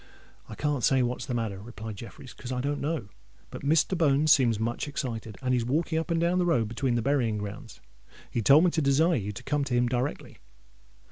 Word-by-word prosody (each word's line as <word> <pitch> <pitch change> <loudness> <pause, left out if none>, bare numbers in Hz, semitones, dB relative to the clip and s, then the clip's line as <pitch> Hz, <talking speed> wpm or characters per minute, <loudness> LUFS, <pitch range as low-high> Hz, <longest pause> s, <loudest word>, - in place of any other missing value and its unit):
"I 110 - -7
can't 145 -2 -1
say 130 -2 +4
what's 125 +2 -3
the 125 - -2
matter," 110 -5 -3
replied 110 -1 -8
Jeffreys, 120 +4 -10
"because 125 - -8
I 125 - -2
don't 145 +2 -2
know. 150 -8 -2 0.4
But - - -7
Mr. 155 +5 +2
Bones 155 -2 +3
seems 120 -8 +4
much 115 +5 -2
excited—and 125 -3 -3
he's 125 -2 +1
walking 160 +6 0
up 165 - -5
and 165 -1 +1
down 175 +2 +2
the 180 - +2
road 120 -10 +2
between 125 +1 -1
the 120 - 0
burying 125 -5 +1
grounds. 105 0 -8 0.5
He 120 - -1
told 140 +8 +6
me 180 - +3
to 160 - 0
desire 150 +5 +3
you 105 -8 -1
to 100 - -9
come 145 0 0
to 130 -2 -1
him 120 0 +3
directly." 125 +3 -3
130 Hz, 215 wpm, -27 LUFS, 115-150 Hz, 0.5 s, told